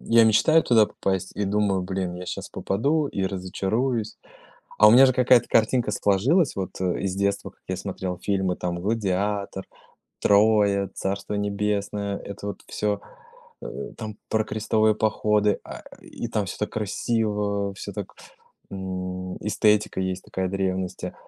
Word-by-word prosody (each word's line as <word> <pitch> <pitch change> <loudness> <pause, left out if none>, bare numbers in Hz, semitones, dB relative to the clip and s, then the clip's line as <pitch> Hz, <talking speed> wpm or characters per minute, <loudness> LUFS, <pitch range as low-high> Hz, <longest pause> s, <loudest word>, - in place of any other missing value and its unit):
Я 115 0 +5
мечтаю 115 +9 +5
туда 110 -3 +5
попасть 95 -2 -2
и 105 - 0
думаю: 100 -1 +1
"Блин, 95 -1 -3
я 90 +1 -7
щас - - -5
попаду 145 +10 0
и 100 - -3
разочаруюсь". 105 +5 -2 0.6
А 105 - +8
у - - +8
меня 130 +4 +9
же 130 - +2
какая-то 125 -1 +4
картинка 115 0 +2
сложилась 125 - +2
вот, 95 -1 -5
э, 90 -1 0
из 95 -1 -2
детства, 100 0 -1
как - - -27
я - - -2
смотрел 90 -2 -4
фильмы, 95 -2 0
там 85 -1 -3
"Гладиатор", 100 -1 -1 0.6
"Троя", 100 -1 +4
"Царство 100 +2 -3
небесное", 100 0 -1
это 100 0 -8
вот 100 - -7
всё, 105 -1 -1 0.6
э, - - -5 0.3
там 110 -2 -6
про 110 0 +2
крестовые 110 0 +1
походы, 105 -1 +1
а, - - -9 0.2
и 120 - -7
там 105 -3 -1
всё - - -6
так 105 - -2
красиво, 105 -2 -1
всё - - -7
так, - - -6 0.6
м, 95 -1 -5
эстетика 105 -2 +2
есть 95 0 -3
такая 95 -1 -3
древности, 95 -1 -2
100 Hz, 150 wpm, -25 LUFS, 95-110 Hz, 0.6 s, меня